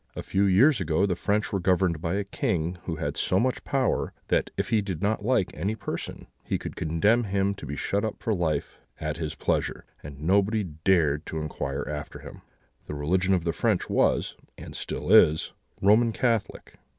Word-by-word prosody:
A - - -5
few 100 +1 +1
years 115 +7 +5
ago 85 +3 +2
the 95 -3 0
French 105 +4 -1
were 100 - +1
governed 90 -3 +1
by 85 +1 -1
a 100 - 0
king 90 -3 -2
who 85 - -2
had 75 -2 -3
so 95 - +1
much 130 +2 0
power, 135 -3 0 0.2
that, - - +1
if - - -1
he 110 -2 +3
did 95 -5 -5
not 105 0 0
like 105 -5 +1
any 100 +8 -2
person, 100 -3 -6 0.2
he - - -1
could - - -7
condemn 105 +10 +2
him 100 0 0
to 100 - -9
be 70 - -4
shut 100 +7 -1
up 110 - -2
for 115 - -1
life 80 -6 -2 0.2
at 75 -1 -3
his 80 -3 -4
pleasure, - - -1 0.2
and 70 -1 -10
nobody 100 +6 +2
dared 80 -2 +1
to 80 - -3
inquire 70 -2 -3
after 75 0 -5
him. - - -11 0.5
The 75 - -5
religion 90 +6 +2
of 90 - -1
the 85 -1 -1
French - - 0
was, - - +2 0.2
and - - -9
still - - -4
is, 80 +1 +5 0.3
Roman 110 +3 +5
Catholic. 115 -4 -2
95 Hz, 195 wpm, -26 LUFS, 80-100 Hz, 0.5 s, years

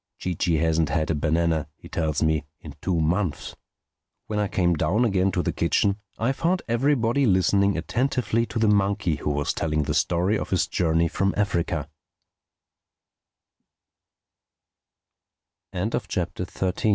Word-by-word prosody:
Chee 90 - -3
Chee 85 0 0
hasn't 80 0 +1
had 80 -1 0
a - - +2
banana, 80 0 0
he - - -13
tells 80 -2 -1
me, 80 -1 +1 0.2
in - - -10
two 90 -3 0
months." 85 +1 -1 0.7
When 105 -1 -2
I 105 - +1
came 90 -2 +1
down 90 +10 +1
again 95 -3 +2
to 90 - 0
the - - -1
kitchen 100 +4 +1 0.2
I 115 +4 +1
found 170 +6 0
everybody 125 +1 +2
listening 100 +1 +3
attentively 115 +4 0
to - - -5
the 110 -1 +2
monkey 100 -6 +2
who 75 - -3
was 75 0 -1
telling 75 -1 0
the - - -2
story 90 +5 +1
of - - -5
his 95 - +2
journey 85 -1 +1
f 95 +4 -1
90 Hz, 130 wpm, -25 LUFS, 80-105 Hz, 0.7 s, listening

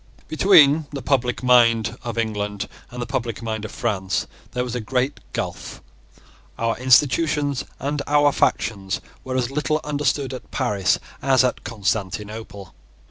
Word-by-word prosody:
Between 155 -3 +5
the 140 -3 -6
public 125 -2 0
mind 115 -2 +4
of 120 -2 -5
England 105 -2 -2 0.2
and 125 - -9
the 120 - -2
public 115 -2 -3
mind 110 -1 -3
of - - -7
France, 95 -5 -1 0.3
there 125 - 0
was 125 -2 -5
a 125 - -2
great 130 +5 -1
gulph. - - -5 0.8
Our 115 0 0
institutions 140 +2 +3 0.2
and 145 +1 -2
our 145 0 +4
factions 100 -6 0 0.2
were 130 0 -4
as 125 0 -1
little 150 +2 0
understood 145 -2 -1
at 130 - -9
Paris 105 -8 +1 0.2
as 135 -1 +4
at 125 - -1
Constantinople. 105 -1 -4
125 Hz, 140 wpm, -22 LUFS, 110-140 Hz, 0.8 s, Between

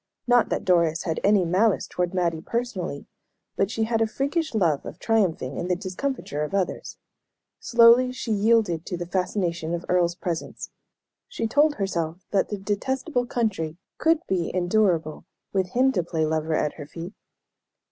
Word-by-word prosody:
Not 245 -2 +4
that - - -2
Doris 170 -3 +2
had 160 -3 -2
any 200 -3 +4
malice 190 +5 +2
toward 180 -1 -2
Mattie 170 -3 0
personally; 190 -10 -3 0.5
but 195 - +1
she 225 0 -1
had 225 0 0
a 225 - +3
freakish 280 +5 -2
love 165 -9 +2
of - - -8
triumphing 185 - 0
in 175 - -3
the 180 - +1
discomfiture 190 - -4
of 150 +6 -2
others. 190 -3 -2 0.6
Slowly 235 +2 +6
she 255 -2 -5
yielded 210 -5 +2
to 180 - -3
the 175 - -4
fascination 175 -2 -1
of 170 - -6
Earle's 175 -1 +2
presence. 175 -2 -5 0.6
She 485 - -3
told 290 +6 +3
herself 180 -3 -3
that 195 - +1
"the 205 - -3
detestable 245 - -2
country" 190 -10 -2 0.2
could 325 +1 +2
be 180 -3 -1
endurable 175 -4 +1 0.3
with 190 -2 0
him 260 +2 +4
to 190 - 0
play 165 -2 -1
lover 155 0 0
at 150 - 0
her 145 -3 -9
feet. 170 +5 -8
190 Hz, 165 wpm, -25 LUFS, 170-225 Hz, 0.6 s, Slowly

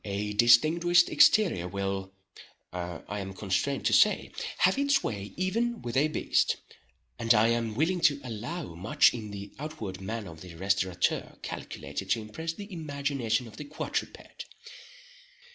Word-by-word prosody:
A 105 +1 -3
distinguished 160 +10 +5
exterior 180 - +4
will, 95 0 -3 0.6
I 90 +3 -5
am 95 0 -6
constrained 100 +9 -1
to - - +2
say, - - +4 0.3
have 185 +8 +3
its 280 -1 +2
way 100 -2 -4
even 230 +6 -1
with 120 -1 -4
a 140 +3 +4
beast; 155 - +1 0.6
and 115 0 +4
I 110 +2 +4
am 115 -2 -1
willing 170 +7 +1
to 140 -1 -6
allow 125 - -5
much 115 - +3
in 110 -3 -6
the 100 0 -8
outward 115 -12 -6
man 110 +1 -4
of 80 -1 -11
the 90 -2 -10
restaurateur 95 0 0
calculated 70 +7 -6
to 115 - +2
impress 160 +10 -5
the 200 +3 -9
imagination 140 -7 -2
of 110 - -13
the 150 - -6
quadruped. 145 +2 -5
115 Hz, 145 wpm, -28 LUFS, 100-155 Hz, 0.6 s, distinguished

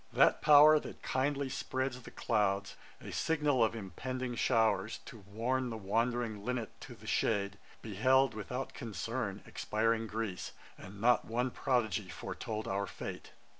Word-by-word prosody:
' - - -25
That - - +5
power 150 +1 +8
that - - -10
kindly 140 +1 0
spreads 130 -1 -3
The - - -10
clouds, 100 -3 0 0.2
a - - -8
signal 150 -6 +2
of 110 0 +1
impending 125 +5 -4
showers, 115 -2 +2
To 115 - -10
warn 115 +6 -2
the 115 - -4
wand'ring 115 +1 -1
linnet 120 -2 -2
to - - -9
the - - -16
shade, 100 -2 0 0.2
Beheld, 130 +5 +3
without 125 +5 -5
concern, 105 0 -4
expiring 115 +1 0
Greece, 110 -4 -4 0.2
And 100 +2 -11
not 120 +3 +4
one 125 +3 -1
prodigy 110 -7 0
foretold 110 +4 -5
our 100 0 -1
fate. - - -7
115 Hz, 145 wpm, -33 LUFS, 105-130 Hz, 0.2 s, power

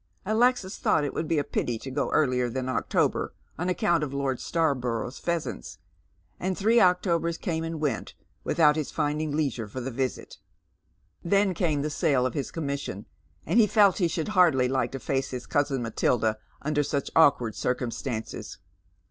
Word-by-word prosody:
Alexis 220 -1 +1
thought 150 - +2
it 145 - -2
would 160 - -2
be 165 - +1
a 145 - +2
pity 120 -3 -2
to 135 +4 -8
go 140 +2 -1
earlier 125 -5 +2
than 130 +2 -3
October, 130 - 0 0.2
on 175 +2 -1
account 170 -3 +1
of 145 - -3
Lord 135 -2 -1
ytarborough's 130 -7 -1
pheasants, 170 - -3 0.6
and 185 0 -2
three 225 +4 +4
Octobers 170 -2 +2
came 165 -5 -2
and 165 -1 -4
went 150 -2 -2 0.3
without 150 -3 +4
his 155 -3 -2
finding 150 0 -1
leisure 130 -8 -1
for 120 +5 -6
the 130 +1 -4
visit. 130 +1 -4 0.8
Then 195 +2 +2
came 155 -5 0
the 150 - -2
sale 135 -3 +2
of 130 - -2
h's 140 - -2
commission, 140 - -4 0.4
and 235 - +3
he 215 - +6
felt 205 -3 +4
he 175 - +3
should 165 +1 -3
hardly 170 -11 +4
like 125 -2 0
to 135 - -4
face 135 +3 -1
hia 125 -1 -4
cousin 140 -1 0
Matilda 110 -1 0 0.2
under 150 0 +1
such 140 -1 -2
awkward 140 -8 +4
circumstances. 125 -1 -3
145 Hz, 170 wpm, -27 LUFS, 130-170 Hz, 0.8 s, he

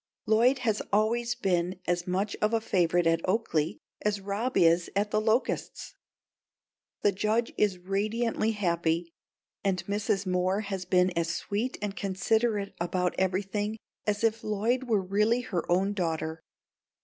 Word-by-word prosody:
Lloyd 235 +5 +4
has 215 -2 +1
always 235 +4 +1
been 180 -1 0
as 175 0 -1
much 195 +3 -1
of 215 +2 +2
a - - +2
favourite 175 -5 +1
at 165 0 +3
Oaklea 175 -6 0 0.2
as 210 -1 0
Rob 205 +6 -2
is 170 +1 +4
at 205 +1 +1
The 215 - +2
Locusts. 225 +3 -1 1.1
The 205 - +5
Judge 215 +4 0
is 200 -3 +2
radiantly 215 +4 0
happy 170 -4 0 0.5
and 190 -2 0
Mrs. 200 -1 -1
Moore 185 +2 +1
has 195 -3 -4
been 180 0 +3
as 170 -1 -1
sweet 225 +6 -2
and 205 -1 -3
considerate 205 +2 0
about 180 +1 0
everything 200 +3 -1 0.3
as 210 +1 0
if 225 0 +1
Lloyd 225 +5 0
were 215 -5 +1
really 210 +6 +2
her 190 -9 -3
own 195 +3 +2
daughter. 160 -4 -2
200 Hz, 145 wpm, -28 LUFS, 180-215 Hz, 1.1 s, The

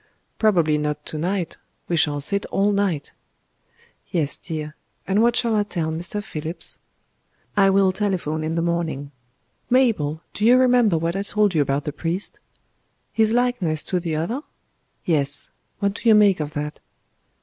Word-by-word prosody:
"Probably 170 -8 +3
not 150 0 -3
to 155 - -3
night. 180 0 -2 0.3
We 175 - 0
shall 150 -3 +2
sit 200 +7 -1
all 200 +1 +1
night." 195 -8 0 1.0
"Yes, 150 -5 -1
dear. 155 -1 -5 0.3
And 195 +3 +3
what 235 +1 +3
shall 230 -2 +3
I 210 - +3
tell 170 -6 -2
Mr. 175 +6 -4
Phillips?" 160 -3 -6 0.8
"I 195 -2 +5
will 195 -1 +4
telephone 185 -6 -1
in 160 +1 -2
the 165 - 0
morning.... 165 -5 -2 0.6
Mabel, 215 - +2
do 210 - -4
you 240 +3 +7
remember 245 -7 +4
what 165 +2 -1
I 195 - 0
told 210 -1 +1
you 155 - +3
about 140 +1 0
the 150 - -4
priest?" 170 +6 -3 0.7
"His 220 -1 +3
likeness 230 -11 +1
to 180 - -1
the 165 -2 -2
other?" 215 - -2 0.6
"Yes. 140 -4 0 0.3
What 200 -1 0
do 230 - 0
you 220 - +8
make 205 -4 +5
of 150 0 -4
that?" 150 0 -4
175 Hz, 160 wpm, -23 LUFS, 155-205 Hz, 1.0 s, you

